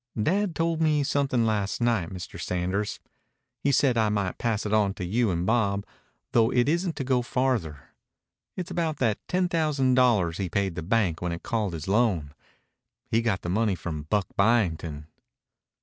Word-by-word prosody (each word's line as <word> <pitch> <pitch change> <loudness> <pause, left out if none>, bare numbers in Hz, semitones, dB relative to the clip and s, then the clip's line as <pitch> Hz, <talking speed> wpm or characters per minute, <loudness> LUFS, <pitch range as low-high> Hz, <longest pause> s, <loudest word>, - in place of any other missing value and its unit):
"Dad 185 - +1
told 165 +1 0
me 155 -2 +3
something 135 -4 +1
last 105 -3 -1
night, 115 -8 +1
Mr. 90 -2 -8
Sanders. 95 +3 -2 0.6
He 140 - +1
said 130 -3 +3
I 110 -1 +3
might 100 -3 -2
pass 115 -3 -1
it 105 - -2
on 100 -2 +2
to 95 - -4
you 110 +5 +1
and 85 -1 -1
Bob, 100 -3 +1 0.5
though 115 -1 +4
it 125 -1 +2
isn't 170 +2 0
to - - -3
go 130 -1 +1
farther. 120 - -1 0.7
It's 185 -1 -4
about 160 -3 -1
that 110 -5 +1
ten 180 0 +1
thousand 150 -6 +1
dollars 110 -10 +3
he 95 -2 -2
paid 100 -1 0
the 85 - -5
bank 90 -2 0
when 90 -1 -2
it 85 - -5
called 110 -5 -1
his 80 0 -6
loan. 95 -9 +1 0.8
He 115 - +3
got 110 -5 -1
the 85 - -3
money 105 +1 +1
from 80 -3 -6
Buck 105 -2 +2
Byington." 85 -9 +1
110 Hz, 180 wpm, -26 LUFS, 90-130 Hz, 0.8 s, though